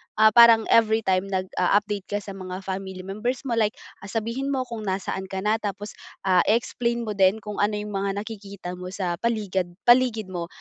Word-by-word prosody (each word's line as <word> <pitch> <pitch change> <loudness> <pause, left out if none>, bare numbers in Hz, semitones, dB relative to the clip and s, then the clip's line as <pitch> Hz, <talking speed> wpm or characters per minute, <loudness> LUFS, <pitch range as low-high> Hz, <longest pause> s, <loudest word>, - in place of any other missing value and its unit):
ah, 215 0 +6
parang 230 -1 +8
every 225 0 +4
time 190 0 +1
nag-u-update 195 +1 0
ka 205 0 -3
sa 200 - -7
mga 185 0 -7
family 190 -1 -5
members 215 +8 -3
mo, 235 -4 -1
like, 215 0 +1 0.2
ah, 195 - -10
sabihin 230 +6 -3
mo 270 -2 0
kung 230 -4 -7
nasaan 190 0 -3
ka 190 0 -5
na, 215 +2 +2
tapos, 205 0 -5 0.3
ah, 185 -2 +4
explain 235 +1 0
mo 215 - -3
din 200 +2 +2
kung 210 -1 -6
ano 210 +1 +2
yung 210 0 -5
mga 195 0 -2
nakikita 200 -4 -8
mo 180 - -6
sa 185 -2 -3
paligad 205 -6 -1 0.2
paligid 240 -5 +3
mo 170 -2 -4
205 Hz, 190 wpm, -24 LUFS, 190-225 Hz, 0.3 s, parang